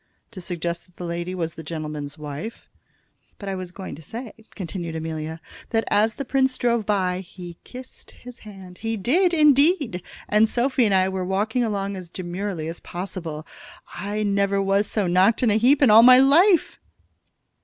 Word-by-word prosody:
"To 195 -5 -9
suggest 170 0 -4
that 180 - -29
the 180 - -6
lady 170 +2 -4
was 165 -3 -3
the 160 - -9
gentleman's 150 -2 -6
wife?" 150 +9 -7 0.7
"But 200 - -9
I - - -2
was 185 -2 -6
going 190 +1 -8
to 145 - -10
say," 225 - -8 0.2
continued 170 -3 -5
Amelia, 160 0 -5 0.3
"that 225 -1 +1
as 215 +2 +2
the 275 - -5
prince 265 0 +1
drove 235 -3 0
by 185 -3 0
he 175 -2 -10
kissed 255 +1 -12
his 245 0 -13
hand 190 -4 -12
he 225 0 -3
did, 335 - +2
indeed. 295 - +3 0.3
And 215 +1 +3
Sophy 255 0 +1
and 200 -3 +2
I 185 0 +3
were 190 -1 -3
walking 210 +6 0
along 200 -3 -2
as 180 -2 -8
demurely 180 -1 -5
as 165 +1 -6
possible. 170 -4 -6 0.5
I 210 +1 -3
never 200 -1 +1
was 195 +1 +1
so 210 -3 -1
knocked 185 +7 +3
of 230 - +4
a 210 - +2
heap 270 +5 +4
in 245 - +6
all 220 +2 +9
my 250 +1 +9
life." 325 +7 +4
195 Hz, 180 wpm, -23 LUFS, 175-230 Hz, 0.7 s, all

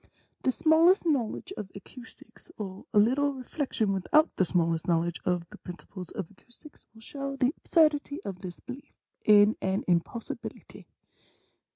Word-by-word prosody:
The 260 - +2
smallest 330 +7 +4
knowledge 295 - -1
of 195 - -5
acoustics, 250 - -11
or 195 -2 -7
a 210 - 0
little 270 +7 +4
reflection 255 -5 -1
without 300 - +3
the 185 - +2
smallest 165 -2 0
knowledge 170 0 +1
of 175 -2 0
the - - -12
principles 180 0 -9
of 195 -2 -6
acoustics, 240 +8 -17
will 220 - -15
show 275 +3 -5
the 270 +1 +2
absurdity 300 -3 +2
of 190 -2 -6
this 180 -2 -7
belief 255 +2 -10 0.3
in 210 +1 +7
an 190 +1 0
impos 180 +6 -1
sibility. - - -11
220 Hz, 150 wpm, -28 LUFS, 185-285 Hz, 0.3 s, in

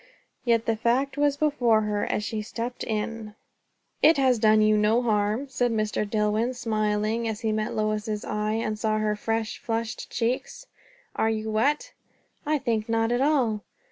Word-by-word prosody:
Yet 230 -2 +2
the 225 - +1
fact 250 +5 0
was 290 -1 +2
before 250 -7 +2
her 210 -1 -1
as 210 - -1
she 215 0 -3
stepped 235 +3 -5
in. 215 0 -4 0.7
"It 320 0 +6
has 260 -4 +3
done 215 0 +5
you 215 0 +4
no 215 +3 +3
harm!" 215 +3 0
said 245 -2 0
Mr. 215 -1 -1
Dillwyn, 215 +3 0
smiling, 215 0 0
as 220 0 -4
he 220 -2 0
met 215 0 -2
Lois's 215 0 -1
eyes, 215 +2 -1
and 215 0 -3
saw 215 -1 +1
her 215 -1 0
fresh, 225 +1 -2
flushed 225 0 -3
cheeks. 245 - -2 0.5
"Are 220 - +1
you 220 0 -2
wet?" 290 - 0 0.5
"I 305 0 +2
think 230 -5 -2
not 225 0 +1
at 245 +1 +1
all." 260 -8 +2
225 Hz, 170 wpm, -26 LUFS, 215-245 Hz, 0.7 s, It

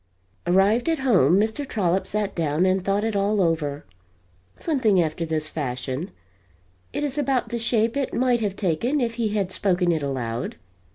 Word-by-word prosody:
Arrived 200 - +3
at 325 - +2
home, 195 - +4
Mr. 220 +7 0
Trollop 190 -7 0
sat 205 -1 -1
down 160 +1 +1
and 185 0 +2
thought 200 +2 0
it 225 -1 -1
all 200 +1 +1
over 160 -5 0 0.7
something 255 - +2
after 165 0 -1
this 155 -1 -2
fashion: 130 +3 -3 0.8
it - - -3
is 290 0 -2
about 270 -3 0
the 235 - -2
shape 230 0 +1
it 280 -2 -1
might 245 -2 +1
have 200 -3 -1
taken 215 - 0
if 235 -3 0
he 225 - +2
had 205 -3 -1
spoken 180 -3 +1
it 160 -2 0
aloud. 125 -4 -3
195 Hz, 170 wpm, -24 LUFS, 165-230 Hz, 0.8 s, home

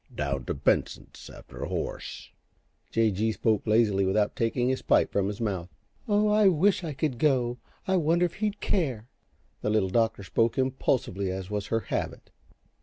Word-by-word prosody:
"Down 70 -3 -2
t' - - -2
Benson's 70 - -1
after - - -12
a - - -2
horse." - - -5 0.6
J. 115 -1 +2
G. 110 +4 0
spoke 110 -1 0
lazily, 105 -3 +3
without 105 +2 +1
taking 120 +2 0
his 130 0 0
pipe - - +3
from 100 -1 +1
his 105 0 -4
mouth. 95 -6 -2 0.4
"Oh, 210 0 +3
I 210 -1 +4
wish 190 +2 +3
I 160 -3 -3
could 135 -3 -2
go 125 -4 +1 0.3
I 190 0 +3
wonder 170 +1 +3
if 175 - -3
he'd 210 0 -2
care." 130 - -1 0.5
The - - -1
Little 105 -3 +2
Doctor 110 0 +1
spoke 115 +4 +1
impulsively 130 -7 0
as 95 +1 -5
was 105 -1 -2
her 115 0 0
habit. - - -4
115 Hz, 175 wpm, -27 LUFS, 100-155 Hz, 0.6 s, I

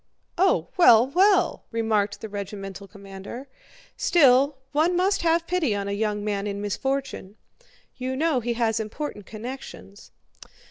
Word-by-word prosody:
"Oh, 380 +2 +2
well, 240 -10 +7
well!" 365 +4 +2
remarked 215 -3 -1
the 220 - -5
regimental 200 -1 -7
commander. 200 +6 -10 0.5
"Still, 275 -3 +4
one 315 +5 +2
must 390 +2 +1
have 335 0 +2
pity 335 - 0
on 200 0 -3
a - - -3
young 210 0 -2
man 205 -1 -2
in 200 0 -4
misfortune. 210 -1 -3 0.6
You 260 0 -3
know 305 -1 +1
he 240 0 -2
has 230 -1 0
important 220 -1 -6
connections... 220 - -9
230 Hz, 135 wpm, -24 LUFS, 205-295 Hz, 0.6 s, well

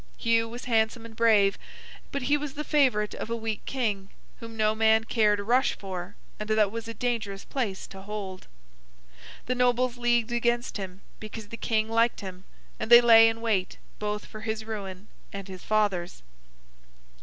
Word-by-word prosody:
Hugh 230 -1 +2
was 240 +2 -8
handsome 225 -1 +1
and 225 -1 -11
brave, 215 -4 +4 0.5
but 280 - -3
he 285 +4 +3
was 295 -2 -4
the 300 - -3
favourite 255 -9 +2
of - - -6
a 230 - -1
weak 225 -2 -4
King, 210 -7 -2 0.3
whom 230 -1 -9
no 215 0 +3
man 220 0 +4
cared 215 -2 +2
a - - -3
rush 250 +5 +3
for, 185 0 -6 0.2
and 215 0 -5
that 215 -2 +3
was 230 0 -5
a 230 - -5
dangerous 215 -4 -2
place 220 -8 -3
to 190 - -11
hold. 195 -2 -6 1.0
The 255 - 0
Nobles 250 0 +1
leagued 240 -1 +1
against 240 0 0
him, 190 -1 -7 0.2
because 215 -1 -8
the 230 - -6
King 220 -1 0
liked 230 +1 +2
him; 185 -1 -8 0.3
and - - -3
they 240 0 +11
lay 225 -1 +8
in 225 0 -5
wait, 205 -6 0 0.2
both 210 0 -3
for 215 - -10
his 220 0 -3
ruin 200 -3 -6 0.2
and 200 -1 -7
his 185 -2 -9
father's. 200 - 0
220 Hz, 180 wpm, -27 LUFS, 205-235 Hz, 1.0 s, they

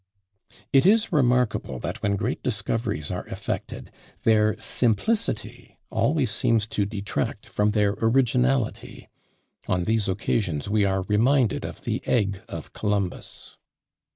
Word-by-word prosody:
It 135 - +6
is 225 +2 +4
remarkable 125 - +2
that - - -5
when 100 -1 +1
great 115 +5 -2
discoveries 105 -6 -2
are - - -5
effected, - - -5 0.3
their 110 -2 +3
simplicity 125 - -1
always 140 -6 +1
seems 115 -2 +2
to 100 -3 0
detract 100 -1 -3
from 105 0 0
their 105 -1 +2
originality: 125 +1 +1 0.6
on 90 -1 +1
these 110 0 +1
occasions 95 -5 -1
we 105 0 +2
are 95 -1 0
reminded 115 +4 +2
of - - -7
the - - -2
egg 100 -5 +1
of 80 -2 -7
Columbus! 100 -3 -3
110 Hz, 125 wpm, -25 LUFS, 100-125 Hz, 0.6 s, It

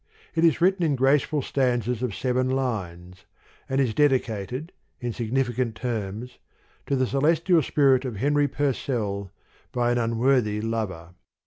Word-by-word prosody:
" - - -29
It 165 - +1
is 165 -2 +4
written 185 0 +3
in 150 -4 +2
graceful 140 +2 +2
stanzas 125 -3 0
of 120 -6 -2
seven 130 0 0
lines, 95 -9 -3 0.4
and 135 -4 +1
dedicated, 130 - 0 0.3
in 120 -2 -3
significant 120 0 -1
terms, 115 0 -4 0.5
To 140 - +1
the 130 -1 +2
Celestial 160 +6 +2
Spirit 135 -2 +3
of 125 -4 -4
Henry 145 +6 +2
Pur 140 0 0
cell 100 -7 -3 0.4
by 120 -1 +1
an 120 - +1
Unworthy 115 -1 +1
Lover. 105 -7 -4
125 Hz, 140 wpm, -25 LUFS, 110-140 Hz, 0.5 s, is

